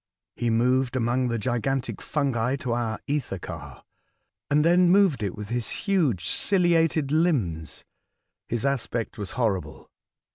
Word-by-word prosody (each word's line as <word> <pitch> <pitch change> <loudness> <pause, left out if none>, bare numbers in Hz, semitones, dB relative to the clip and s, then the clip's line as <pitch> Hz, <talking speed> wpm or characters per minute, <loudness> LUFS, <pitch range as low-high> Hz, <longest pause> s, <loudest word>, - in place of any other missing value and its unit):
He 120 - -1
moved 125 +3 +2
among 125 +1 +1
the 115 -1 -1
gigantic 125 +3 -2
fungi 130 -4 0
to 130 -3 -4
our 115 -2 -2
ether 145 -9 -2
car, - - -9 0.7
and 150 +1 +3
then 175 +1 +5
moved 185 - +4
it 100 -3 -2
with 105 -1 -7
his 120 -1 -2 0.2
.huge 150 - +1
ciliated 165 - +2
limbs. 115 - 0 0.7
His 120 +2 -1
aspect 125 -5 -2
was 100 -2 -5
hor 110 -7 +1
rible. - - -14
125 Hz, 140 wpm, -25 LUFS, 115-150 Hz, 0.7 s, then